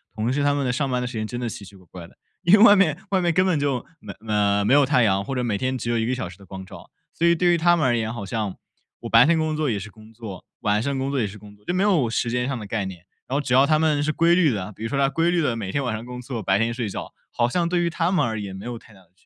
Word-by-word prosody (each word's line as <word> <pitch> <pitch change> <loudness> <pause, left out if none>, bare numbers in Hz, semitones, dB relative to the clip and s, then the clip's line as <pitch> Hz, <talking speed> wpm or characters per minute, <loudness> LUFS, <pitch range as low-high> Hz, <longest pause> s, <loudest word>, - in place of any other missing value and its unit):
同 110 +3 -1
事 145 - 0
他 145 0 +3
们 140 -1 -1
的 125 - +1
上 135 +2 -1
班 125 -1 -1
的 125 - -3
时 125 - -7
间 110 0 -2
真 120 +2 -5
的 120 - -3
奇 105 - -8
奇 100 0 -13
怪 95 -1 -18
怪 85 -2 -9
的， - - -23 0.3
因 175 +1 +4
为 - - +3
外 205 -3 +9
面 175 -7 +2
外 190 -2 +2
面 175 -1 +2
根 185 +3 +3
本 180 -5 +1
就 140 -4 -1
没 - - -9
呃， 100 -1 +1
没 115 - +3
有 145 0 +6
太 130 -3 +3
阳， 100 -2 +2
或 135 +6 -5
者 125 - -1
每 115 -4 -1
天 130 +3 -2
只 120 -1 -4
有 115 - +1
1 110 - 0
个 130 - 0
小 125 -8 -4
时 90 - -13
的 100 - -16
光 95 -1 -8
照。 - - -13 0.2
所 170 - -1
以 170 - +5
对 175 +1 +3
于 - - +3
他 175 +1 +4
们 155 - +1
而 120 -2 +2
言， 110 -1 -2
好 115 -4 -6
像 105 -2 -3 0.5
我 - - -6
白 115 +1 +7
天 170 0 +3
工 155 -1 -1
作 155 -2 0
也 110 - 0
是 100 +1 -8
工 110 0 -17
作， 110 -5 -9 0.2
晚 105 -1 +1
上 140 +2 -2
工 135 +1 -2
作 140 - -1
也 110 - 0
是 100 +2 -10
工 105 0 -14
作， 105 - -27
就 175 - -3
没 185 - +2
有 175 - +2
时 115 +1 -1
间 125 0 -1
上 135 -1 -2
的 110 - -7
概 105 0 -2
念。 90 -2 -9 0.2
然 130 - -3
后 145 - +1
只 125 -2 0
要 135 - +6
他 155 +1 +2
们 150 -2 +2
是 155 - 0
规 170 +2 +3
律 170 -5 +3
的， 100 -2 -4
比 110 - -9
如 115 - -2
说 140 - -1
他 135 -1 +3
规 165 +5 +1
律 175 -1 +1
地 125 -6 0
每 100 -4 -4
天 140 - -1
晚 125 -4 -2
上 110 +2 -7
工 125 0 -8
作， 120 -4 -6
白 95 +1 +2
天 115 +1 +1
睡 120 -1 -3
觉， 100 - -6 0.2
好 120 0 +1
像 170 +5 0
对 175 0 0
于 170 - +1
他 170 +1 -1
们 190 - +2
而 110 -2 -2
言 100 -2 -6
没 95 - -9
有 120 - -5
太 110 -2 -17
大 95 - -18
的 95 - -23
区 - - -32
125 Hz, 375 characters per minute, -23 LUFS, 105-150 Hz, 0.5 s, 外